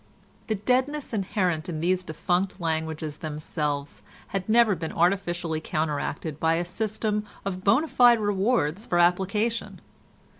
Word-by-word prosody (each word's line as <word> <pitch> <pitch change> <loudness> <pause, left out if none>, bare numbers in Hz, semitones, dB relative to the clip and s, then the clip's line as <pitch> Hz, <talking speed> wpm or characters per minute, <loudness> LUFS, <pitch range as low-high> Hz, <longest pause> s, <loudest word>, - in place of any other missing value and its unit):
The 220 - 0
deadness 260 +7 0
inherent 185 -5 -1
in 160 -3 -3
these 180 +3 +1
defunct 180 +4 -1
languages 160 -2 -2
themselves 150 -2 -3 0.3
had 195 +1 -3
never 230 -1 +5
been 165 -3 -4
artificially 175 -2 0
counteracted 155 0 -2
by 160 0 +2
a 175 +1 -1
system 210 +3 -2 0.2
of 185 -1 -3
bona 240 +11 +4
fide 245 -5 +5
rewards 205 -3 0
for 175 - +1
application. 195 +6 +1
180 Hz, 125 wpm, -26 LUFS, 160-210 Hz, 0.3 s, never